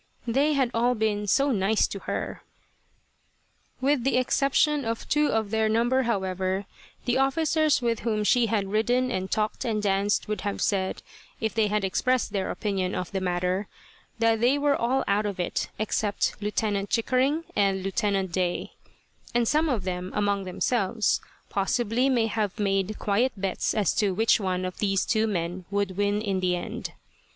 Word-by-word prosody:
They 275 +6 +2
had 265 -4 +1
all 240 +2 +2
been 210 -2 -1
"so 275 +7 +3
nice" 210 -1 +2
to 200 - -5
her. - - -4 1.4
With 270 -1 +1
the 270 0 +2
exception 280 +3 +2
of 230 -1 -3
two 300 +1 +2
of 220 -4 0
their 220 -1 +2
number, 240 +4 +2
however, 190 -4 -1 0.4
the 245 +1 +1
officers 305 +1 +2
with 230 -1 +1
whom 215 -2 -1
she 230 +3 +3
had 205 -3 -1
ridden 245 +4 +1
and 190 -3 -2
talked 215 +2 -1
and 225 -4 -1
danced, 200 0 +1
would 210 0 -3
have 205 -1 -3
said, 190 -2 -1 0.4
if 220 -1 -1
they 220 -2 +2
had 210 0 0
expressed 245 +4 0
their 195 -2 -1
opinion 195 -3 -2
of 180 - -4
the 195 -1 -2
matter, 180 +2 -1 0.5
that 225 -1 +2
they 255 +4 +4
were 285 0 +2
all 255 +3 +1
out 205 +1 +1
of 200 -2 -5
it 175 - -2
except 210 -1 0
Lieutenant 205 -1 -1
Chickering 260 +7 +1
and 195 -2 +1
Lieutenant 195 -2 0
Day; 180 0 -1 0.6
and 240 -1 +3
some 310 +4 +2
of 230 -8 -1
them, 180 0 -4
among 200 -1 0
themselves, 210 +3 0 0.3
possibly 235 +5 +1
may 240 -4 +2
have 215 -2 -2
made 195 0 0
quiet 230 +5 +1
bets 190 -1 -1
as 210 -3 +2
to 205 -4 +1
which 225 +3 +3
one 185 -2 -1
of 185 - -6
these 195 -2 +1
two 220 -1 +1
men 175 -2 -3
would 200 -2 -1
win 205 +1 0
in 195 -3 -1
the 180 -1 +1
end. 175 - -5
210 Hz, 170 wpm, -26 LUFS, 195-240 Hz, 1.4 s, they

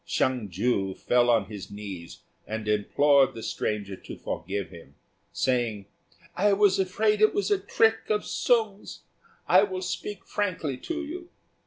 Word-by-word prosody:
Hsiang 125 -5 0
ju 95 0 0
fell 120 0 +2
on 115 -4 +4
his 100 -2 -8
knees 100 -5 -8 0.2
and 110 0 -4
implored 135 +6 +3
the 115 - -7
stranger 100 -2 -3
to - - -10
forgive 95 +1 -4
him, 80 -5 -14 0.4
saying, 120 -6 0 0.5
"I 205 +2 +3
was 200 -1 +4
afraid 210 +3 +1
it 215 - +5
was 410 +1 0
a 405 - +3
trick 225 0 +2
of 210 -1 +1
Sung's: 220 -5 0 0.5
I 185 - +7
will 190 -2 -2
speak 190 +2 -5
frankly 165 -9 -2
to 330 - -4
you. 345 +3 -8
130 Hz, 150 wpm, -27 LUFS, -, 0.5 s, I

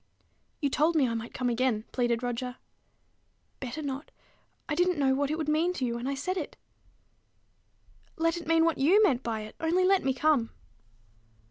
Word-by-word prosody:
"You 285 - +1
told 315 +5 +2
me 280 -5 +4
I 230 - -2
might 230 0 -5
come 250 - -2
again," 235 -2 0
pleaded 240 -1 0
Roger. 245 +1 -3 1.0
"Better 270 +4 -5
not. 275 +1 -5 0.6
I 295 - -1
didn't 355 +2 +2
know 270 -2 +3
what 280 +1 0
it 310 - -1
would 315 -2 -3
mean 320 +4 +2
to 265 - -2
you 235 - -1
when 235 +2 -4
I 275 - -1
said 365 +8 -3
it." 320 - -5 1.6
"Let 330 +1 +1
it 340 -2 -7
mean 330 0 +4
what 330 -4 +1
you 365 +10 +5
meant 265 - +3
by 225 -3 -3
it, 215 0 -9
only 340 +3 +2
let 385 +1 +3
me 265 -1 0
come." 275 -5 +2
280 Hz, 190 wpm, -28 LUFS, 245-325 Hz, 1.6 s, you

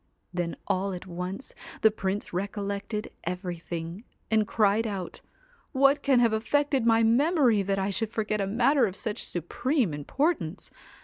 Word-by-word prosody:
Then 175 -1 -2
all 190 +1 0
at 180 - -7
once 180 +7 -6 0.3
the 220 - +7
Prince 200 -2 -3
recollected 200 +2 -3
everything, 175 0 -5 0.3
and 215 -1 +3
cried 215 +1 +2
out 195 -4 -5 0.3
* - - -33
What 275 +1 +4
can 270 -3 +4
have 230 -2 +4
affected 270 +2 +1
my 225 0 +5
memory 250 - +4
that 195 0 0
I 195 +1 0
should 225 +2 0
forget 215 -2 -1
a 195 - 0
matter 240 +4 +3
of 190 - -6
such 215 -1 -3
supreme 210 - -1
importance 175 - -1
210 Hz, 150 wpm, -27 LUFS, 185-240 Hz, 0.3 s, the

